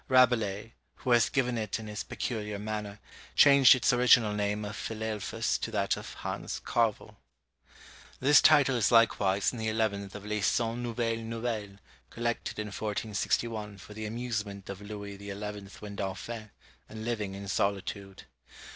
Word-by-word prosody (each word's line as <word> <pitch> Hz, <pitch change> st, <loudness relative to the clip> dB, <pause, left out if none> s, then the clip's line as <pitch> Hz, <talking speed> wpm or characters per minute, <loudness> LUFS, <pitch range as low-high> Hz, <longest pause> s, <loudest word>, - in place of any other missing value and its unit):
Rabelais, 115 Hz, -5 st, +3 dB, 0.2 s
who 130 Hz, -, -3 dB
has 120 Hz, -2 st, +5 dB
given 125 Hz, -3 st, 0 dB
it 110 Hz, -2 st, -2 dB
in 110 Hz, -, -8 dB
his 105 Hz, -1 st, -5 dB
peculiar 105 Hz, -3 st, -4 dB
manner, 105 Hz, 0 st, -4 dB, 0.4 s
changed 140 Hz, -2 st, +8 dB
its 125 Hz, +1 st, +2 dB
original 120 Hz, -3 st, +5 dB
name 105 Hz, 0 st, -1 dB
of 105 Hz, +1 st, -5 dB
Philelphus 110 Hz, 0 st, -2 dB
to -, -, -3 dB
that 100 Hz, -3 st, 0 dB
of -, -, -8 dB
Hans -, -, -4 dB
Carvel. 115 Hz, -3 st, 0 dB, 1.0 s
This 145 Hz, +2 st, +6 dB
title 140 Hz, -4 st, +5 dB
is 120 Hz, -, +2 dB
likewise 100 Hz, -4 st, +4 dB
in 120 Hz, -, -6 dB
the 110 Hz, -, -2 dB
eleventh 105 Hz, -3 st, -1 dB
of 105 Hz, 0 st, -8 dB
Les 105 Hz, 0 st, -2 dB
Cent 115 Hz, +3 st, +1 dB
Nouvelles 115 Hz, -1 st, -1 dB
Nouvelles 115 Hz, -3 st, -4 dB, 0.3 s
collected 120 Hz, 0 st, -3 dB
in 105 Hz, 0 st, -3 dB
1461, 105 Hz, +1 st, -2 dB
for 95 Hz, +2 st, -12 dB
the 110 Hz, 0 st, -5 dB
amusement 105 Hz, -4 st, -4 dB
of 100 Hz, 0 st, -9 dB
Louis 100 Hz, -1 st, -7 dB
XI. 100 Hz, 0 st, -6 dB, 0.5 s
when 105 Hz, -1 st, -7 dB
Dauphin, 105 Hz, +3 st, -5 dB, 0.4 s
and 110 Hz, 0 st, -7 dB
living 105 Hz, -5 st, -2 dB
in 100 Hz, 0 st, -7 dB
solitude. 100 Hz, 0 st, -2 dB
110 Hz, 150 wpm, -30 LUFS, 100-115 Hz, 1.0 s, changed